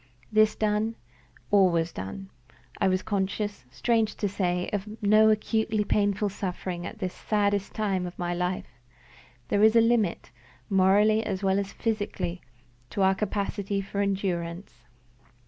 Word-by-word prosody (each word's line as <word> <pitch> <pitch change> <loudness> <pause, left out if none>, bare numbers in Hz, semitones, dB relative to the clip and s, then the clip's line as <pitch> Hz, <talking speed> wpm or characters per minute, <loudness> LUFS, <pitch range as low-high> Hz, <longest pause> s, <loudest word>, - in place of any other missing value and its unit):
This 215 0 +4
done, 215 +1 0 0.6
all 195 -2 +6
was 165 -1 0
done. 190 - -7 0.5
I - - +3
was 185 0 +1
conscious, 205 - -2
strange 220 - 0
to 205 - -1
say, 180 -2 -1
of 205 0 -2 0.2
no 215 +1 +6
acutely 220 0 +1
painful 205 0 +1
suffering 180 -2 -4
at 225 - -9
this 185 -4 -3
saddest 205 -2 0
time 195 -4 -1
of 175 - -10
my 175 0 -2
life. 180 +1 -2 0.8
There 205 - +2
is 220 +1 +6
a - - +8
limit, 225 - +1 0.4
morally 205 +3 +4
as 195 -2 -3
well 190 0 +2
as 200 0 -4
physically, 205 -5 -2 0.5
to 195 - -1
our 190 0 +5
capacity 200 0 -2
for 200 +1 -3
endurance. 190 -3 -2
200 Hz, 145 wpm, -27 LUFS, 185-215 Hz, 0.8 s, a